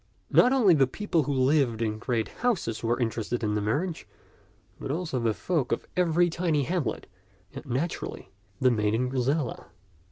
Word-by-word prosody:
Not 250 - +6
only 235 -9 +5
the 135 -4 +4
people 175 +2 0
who 145 - -2
lived 130 -3 +2
in 110 -2 -2
great 115 -2 -1
houses 190 - -2
were 120 +2 0
interested 115 0 -2
in 105 -1 0
the 105 - 0
marriage, 155 - -2 0.7
but - - -6
also 155 -3 -2
the 115 -1 +1
folk 145 +3 -1
of 115 - -1
every 175 -1 +3
tiny 165 -4 0
hamlet, 155 -7 -2 0.5
and - - -7
naturally 135 +7 -3 0.3
the 130 -1 +4
maiden 110 +2 +1
Griselda. 130 +1 -1
130 Hz, 160 wpm, -27 LUFS, 115-170 Hz, 0.7 s, Not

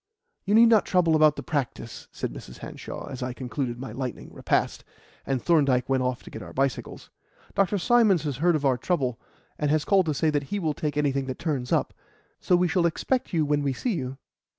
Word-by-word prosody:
"You 205 +2 +2
need 230 +1 +7
not 220 -3 +4
trouble 170 -3 +3
about 155 -1 +5
the - - -6
practice," 130 -5 -4
said - - -4
Mrs. 60 - -10
Hanshaw, - - -8
as 130 - -7
I 125 0 -3
concluded 125 -1 -4
my 130 -3 -6
lightning 125 +1 -6
repast, - - 0 0.4
and 135 -1 0
Thorndyke 135 -3 +2
went 135 0 +1
off 125 0 -2
to - - -12
get 110 - -7
our 85 -3 -10
bicycles. 135 0 -2 0.4
"Dr. 195 +1 +2
Symons 200 -3 +4
has 145 -5 -3
heard 170 +3 +3
of 145 -2 -1
our 130 -2 +2
trouble, 130 -7 -1 0.4
and 150 - 0
has 155 0 +1
called 195 -4 +3
to 155 - 0
say 155 +2 +2
that 145 -1 -1
he 205 - -3
will 160 -6 -1
take 150 -1 -3
anything 140 -2 0
that 130 - -4
turns 140 -7 -3
up; - - +1 0.5
so 180 - +2
we 180 0 +3
shall 170 0 +2
expect 250 +9 -1
you 160 -3 +1
when 145 0 +1
we 140 -2 0
see 235 - -2
you." 135 -5 -4
145 Hz, 220 wpm, -26 LUFS, 130-170 Hz, 0.5 s, need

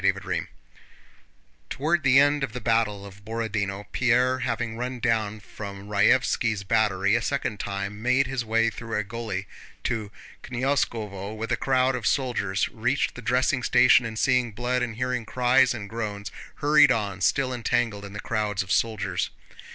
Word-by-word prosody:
CHAPTER 95 0 +1
VIII - - -2 1.2
Toward 160 +4 0
the 135 -2 +4
end 145 +1 +4
of 130 - -3
the 125 - -4
battle 110 -3 0
of 100 0 -13
Borodinó, 105 -3 -3
Pierre, 125 +1 +2
having 115 -1 -2
run 125 +2 -4
down 110 -3 0
from 100 -1 -9
Raévski's 110 -1 +2
battery 100 -2 +2
a 115 - +3
second 115 -5 -2
time, 100 +1 -4
made 125 +3 +3
his 130 -1 -2
way 115 +1 +2
through 115 -1 -5
a 105 - 0
gully 105 -2 -5 0.4
to 110 -4 -2 0.3
Knyazkóvo 115 -6 -2
with 115 +1 -4
a - - +3
crowd 130 0 +2
of 120 -2 -2
soldiers, 105 -8 0
reached - - -1
the - - -9
dressing 125 +1 +1
station, 125 0 +5
and 110 -2 -5
seeing 125 -1 +2
blood 125 +3 -1
and 120 -3 -2
hearing 125 0 -2
cries 125 +2 +3
and 110 -4 -5
groans 105 -3 -5 0.2
hurried 145 0 +5
on, 100 -4 -1
still 130 +6 +1
entangled 115 -3 -1
in 100 0 -9
the 105 - -6
crowds 105 -4 -1
of 95 - -8
soldiers. 110 -3 0
115 Hz, 165 wpm, -25 LUFS, 105-125 Hz, 1.2 s, station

